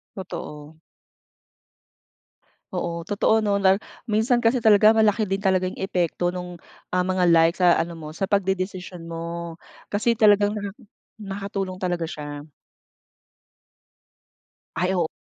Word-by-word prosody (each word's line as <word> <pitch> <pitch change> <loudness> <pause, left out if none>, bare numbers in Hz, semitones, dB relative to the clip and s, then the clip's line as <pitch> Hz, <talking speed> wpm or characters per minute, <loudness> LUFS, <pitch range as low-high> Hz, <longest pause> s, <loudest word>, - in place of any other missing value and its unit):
Totoo. 155 -4 -8 1.9
Oo 170 - -2 0.2
totoo 205 +2 +2
nun 200 -1 +1
at 190 - +4 0.4
minsan 235 +3 +3
kasi 230 +2 +3
talaga 215 -2 +6
malaki 215 0 +3
din 195 - +1
talagang 185 -1 +1
epekto 175 -2 -1
nung 180 -1 -6 0.3
ang 180 0 0
mga 185 -1 +1
like 165 0 +5
sa 175 -1 +5
ano 170 +1 -2
mo 155 -2 -8
sa 165 +5 -3
pagdedesisyon 185 -3 -2
mo 170 0 -6 0.4
kasi 225 +2 +1
talagang 205 -1 +4 0.6
nakatulong 195 -1 -4
talaga 175 -3 -2
siya. 145 0 -7 2.3
Ay 180 +2 0
o 170 -3 +1
185 Hz, 115 wpm, -24 LUFS, 170-205 Hz, 2.3 s, talaga